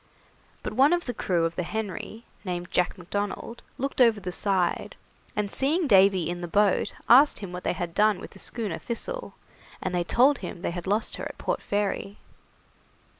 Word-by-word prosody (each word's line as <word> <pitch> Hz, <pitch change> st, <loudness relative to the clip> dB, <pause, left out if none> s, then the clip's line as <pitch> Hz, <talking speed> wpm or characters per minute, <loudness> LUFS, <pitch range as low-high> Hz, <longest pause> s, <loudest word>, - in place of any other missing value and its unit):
But -, -, -4 dB
one 280 Hz, +5 st, +5 dB
of 350 Hz, 0 st, 0 dB
the 245 Hz, -, -3 dB
crew 175 Hz, -6 st, 0 dB
of 165 Hz, 0 st, -2 dB
the 180 Hz, -, -1 dB
'Henry', 220 Hz, +3 st, -5 dB, 0.2 s
named 175 Hz, -2 st, -4 dB
Jack 180 Hz, +2 st, +1 dB
Macdonald, 205 Hz, +5 st, -4 dB, 0.2 s
looked 275 Hz, 0 st, -1 dB
over 230 Hz, -4 st, +5 dB
the 180 Hz, -2 st, -5 dB
side, 185 Hz, -2 st, 0 dB, 0.4 s
and 210 Hz, -1 st, -1 dB
seeing 315 Hz, +6 st, +1 dB
Davy 190 Hz, -, +5 dB
in 175 Hz, +1 st, -4 dB
the 175 Hz, -, -4 dB
boat, 205 Hz, +3 st, +2 dB
asked 275 Hz, +5 st, +7 dB
him 195 Hz, -3 st, -6 dB
what 180 Hz, 0 st, -6 dB
they -, -, 0 dB
had 175 Hz, -2 st, -4 dB
done 210 Hz, 0 st, +3 dB
with -, -, -9 dB
the -, -, -14 dB
schooner 225 Hz, -4 st, -3 dB
'Thistle', -, -, -5 dB, 0.4 s
and 185 Hz, -, -3 dB
they 175 Hz, -1 st, +1 dB
told 260 Hz, +10 st, +4 dB
him 175 Hz, -, -7 dB
they -, -, -1 dB
had 175 Hz, +1 st, -6 dB
lost 210 Hz, +3 st, +1 dB
her -, -, -5 dB
at -, -, -7 dB
Port -, -, -2 dB
Fairy. 205 Hz, 0 st, -2 dB
200 Hz, 190 wpm, -26 LUFS, 180-235 Hz, 0.4 s, asked